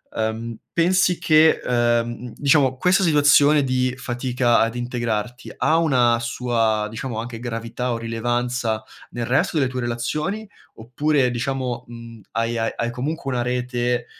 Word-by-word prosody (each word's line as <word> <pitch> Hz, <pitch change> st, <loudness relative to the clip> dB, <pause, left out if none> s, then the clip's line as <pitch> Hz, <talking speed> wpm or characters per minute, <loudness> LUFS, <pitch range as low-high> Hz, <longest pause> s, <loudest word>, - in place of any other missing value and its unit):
uhm, 110 Hz, +1 st, -3 dB, 0.2 s
pensi 180 Hz, +1 st, +2 dB
che, 155 Hz, 0 st, +4 dB
uhm, -, -, -3 dB
mhmm, 120 Hz, -1 st, +2 dB, 0.2 s
mhmm, 115 Hz, -, -10 dB
diciamo 140 Hz, -2 st, +3 dB
questa 180 Hz, +7 st, +3 dB
situazione 145 Hz, -2 st, +5 dB
di 130 Hz, -1 st, 0 dB
fatica 125 Hz, -1 st, 0 dB
ad 115 Hz, +1 st, +1 dB
integrarti 120 Hz, -1 st, -3 dB
ha 160 Hz, -, +2 dB
una 125 Hz, -8 st, +3 dB
sua, 115 Hz, -2 st, 0 dB
diciamo, 115 Hz, +1 st, -5 dB
anche 115 Hz, 0 st, -6 dB
gravità 120 Hz, +1 st, -4 dB
o 115 Hz, -, -1 dB
rilevanza 115 Hz, 0 st, -2 dB, 0.3 s
nel 120 Hz, -1 st, -4 dB
resto 130 Hz, +6 st, +1 dB
delle 135 Hz, -4 st, +2 dB
tue 130 Hz, -, -4 dB
relazioni? 150 Hz, -, -3 dB, 0.3 s
Oppure 130 Hz, +3 st, 0 dB
diciamo, 125 Hz, 0 st, -3 dB
mhmm, 115 Hz, -1 st, -11 dB
hai 115 Hz, +1 st, -1 dB
ae 115 Hz, -, -1 dB
hai 120 Hz, 0 st, -1 dB
comunque 135 Hz, +3 st, -4 dB
una 125 Hz, -1 st, -1 dB
rete 125 Hz, 0 st, -1 dB
120 Hz, 150 wpm, -22 LUFS, 115-135 Hz, 0.3 s, situazione